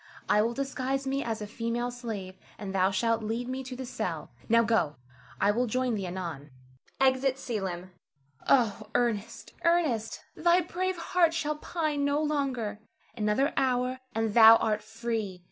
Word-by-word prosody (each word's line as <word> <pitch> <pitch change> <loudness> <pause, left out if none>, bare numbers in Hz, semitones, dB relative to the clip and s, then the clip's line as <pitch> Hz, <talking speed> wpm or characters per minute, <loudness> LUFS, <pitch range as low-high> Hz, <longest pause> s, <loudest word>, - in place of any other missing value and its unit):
I 210 - +4
will 230 +2 0
disguise 270 0 -2
me 275 +1 -1
as 225 -2 -3
a - - -4
female 230 +3 -2
slave, 215 -6 -6 0.2
and 195 -2 -6
thou 190 0 +3
shalt 230 +4 +1
lead 225 +3 -3
me 260 +1 -4
to 255 0 -7
the 260 +1 -6
cell. 245 - -4 0.2
Now 230 +1 +5
go; 220 -10 +1 0.4
I 200 +1 +4
will 245 +4 0
join 255 +2 0
thee 195 -4 -2
anon. 170 -6 -6 0.5
[Exit 265 0 +3
Selim.] 190 -8 -4 0.6
Oh, 220 -5 +3
Ernest, 230 -2 -1
Ernest! 315 -11 +1
thy 345 +2 +4
brave 370 +2 -2
heart 335 -1 +2
shall 300 -2 -1
pine 305 -3 -2
no 285 +1 +2
longer. 275 -9 -1 0.4
Another 220 +6 +1
hour, 255 -1 +1 0.2
and 225 -1 0
thou 225 0 +10
art 215 -2 0
free. 220 -3 -4
235 Hz, 160 wpm, -29 LUFS, 210-270 Hz, 0.6 s, thou